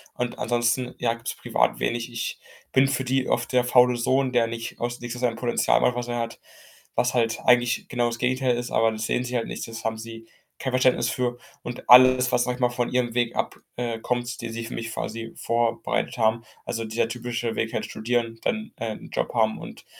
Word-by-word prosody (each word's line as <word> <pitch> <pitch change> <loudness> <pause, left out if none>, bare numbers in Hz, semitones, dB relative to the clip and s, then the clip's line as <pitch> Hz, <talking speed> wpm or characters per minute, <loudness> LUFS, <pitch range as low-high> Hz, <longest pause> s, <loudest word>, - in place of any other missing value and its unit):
Und 125 -1 -3
ansonsten, 120 +1 +1
ja, 115 -1 +1
gibt's 115 0 -5
privat - - +1
wenig. 120 +1 -1
Ich 115 0 -4 0.3
bin 135 +1 +5
für 135 -1 0
die 130 +1 0
oft - - 0
der 125 -1 +4
faule 125 0 +5
Sohn, 130 +2 +1
der 120 -2 +3
nicht 115 0 -6
aus 120 0 -3
nicht 120 0 -5
aus 125 - -7
seinem 120 -2 +1
Potenzial 120 0 +2
macht, 125 - +3
was 120 0 -3
er 120 0 -2
hat, 115 0 -4 0.6
was 125 - +2
halt 115 -2 +1
eigentlich 120 -1 +3
genau 120 -2 +1
das 120 0 -3
Gegenteil 125 0 +1
ist, 120 0 -3
aber 115 0 +3
das 110 0 -3
sehen 125 - 0
sie 125 0 -4
halt 115 - 0
nicht. - - -5
Das 115 0 -8
haben 110 0 -1
sie 115 0 -9 0.3
kein 130 -1 -3
Verständnis 130 0 +3
für. 125 -2 -1 0.3
Und 120 0 -7
alles, 130 0 +8
was, 120 0 +3
sage 125 0 -2
mal, 125 -1 +3
von 120 0 -1
ihrem 125 -2 0
Weg 120 -1 0
ab - - -1 0.2
äh, 120 -2 -2
kommt, 120 0 -2
den 115 -1 -5
sie 115 0 -5
für 115 - -7
mich 115 -1 -4
quasi 115 +1 -5
vorbereitet 115 +1 -1
haben 115 0 +2 0.2
also, 115 - -3
dieser 110 +1 0
typische 120 0 -3
Weg 110 - -1
halt, - - -1
studieren, 115 0 -2
dann, 220 -1 -2
äh, 115 -1 -3
'n - - -11
Job - - -1
haben 110 -2 +2
und - - -10
120 Hz, 220 wpm, -25 LUFS, 115-125 Hz, 0.6 s, alles